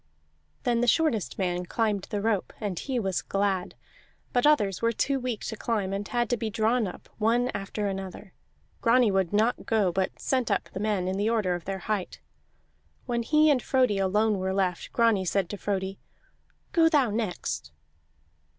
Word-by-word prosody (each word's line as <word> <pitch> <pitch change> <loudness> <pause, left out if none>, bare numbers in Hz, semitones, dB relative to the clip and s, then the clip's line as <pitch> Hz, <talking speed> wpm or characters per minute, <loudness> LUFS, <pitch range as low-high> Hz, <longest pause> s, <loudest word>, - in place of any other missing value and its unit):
Then 240 -1 +1
the 245 - +1
shortest 255 - +1
man 180 -2 -1
climbed 210 -3 0
the 205 - -2
rope, 220 -4 0
and 200 -5 -3
he 265 -2 -2
was 195 -5 0
glad. 195 -2 -1 0.6
But 245 +3 +4
others 205 -11 +3
were 230 0 +3
too 275 +4 0
weak 245 -4 -3
to 220 - -4
climb, 210 -4 -1
and 200 0 -3
had 240 -1 0
to 245 - +2
be 225 -1 -2
drawn 220 +2 +1
up, 180 - -9
one 235 +3 +2
after 200 +1 -3
another. 195 0 -6 0.5
Grani 235 -2 +4
would 190 -3 +1
not 220 +4 +1
go, 210 -5 +2
but 190 +2 -1
sent 255 -3 0
up 200 - 0
the - - -4
men 205 -3 0
in 190 +1 -1
the 205 +2 +1
order 215 -6 +1
of 175 -2 -5
their 195 0 -3
height. 210 -4 -2 0.9
When 240 -1 -1
he 305 +5 +4
and 265 -4 +2
Frodi 250 -7 +2
alone 210 +2 +2
were 190 0 -1
left, 185 -3 -1
Grani 230 -5 +3
said 185 0 0
to - - -4
Frodi: 195 -1 -3 0.7
"Go 325 -1 +5
thou 280 -8 +3
next." 75 - -3
210 Hz, 180 wpm, -27 LUFS, 190-235 Hz, 0.9 s, Go